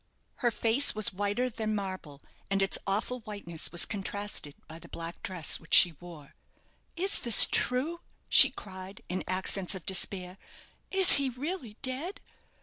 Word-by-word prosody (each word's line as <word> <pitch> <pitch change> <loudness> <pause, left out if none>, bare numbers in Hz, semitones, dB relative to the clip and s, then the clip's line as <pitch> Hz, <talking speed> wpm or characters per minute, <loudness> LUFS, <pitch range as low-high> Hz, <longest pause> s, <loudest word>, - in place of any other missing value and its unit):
Her 240 - 0
face 230 +4 +2
was 215 -2 +2
whiter 205 +6 -2
than 220 -3 -4
marble, 185 -8 -7 0.3
and 195 0 0
its 195 - 0
awful 215 +6 -3
whiteness 200 -7 -4
was 175 - +1
contrasted 200 -7 -4
by 160 +1 -11
the 170 0 -15
black 165 +1 -9
dress 180 -6 +1
which - - +1
she 175 - +7
wore. 165 -5 -14 0.6
"Is 380 +4 0
this 235 -4 +8
true?" 290 +8 -2 0.3
she - - +8
cried, 190 0 -12
in 185 +1 -4
accents 185 +1 -1
of 185 - -10
despair. 185 0 -1 0.5
"Is 380 -1 +4
he 275 -1 -1
really 255 - -7
dead?" 275 +9 -5
200 Hz, 150 wpm, -28 LUFS, 185-250 Hz, 0.6 s, this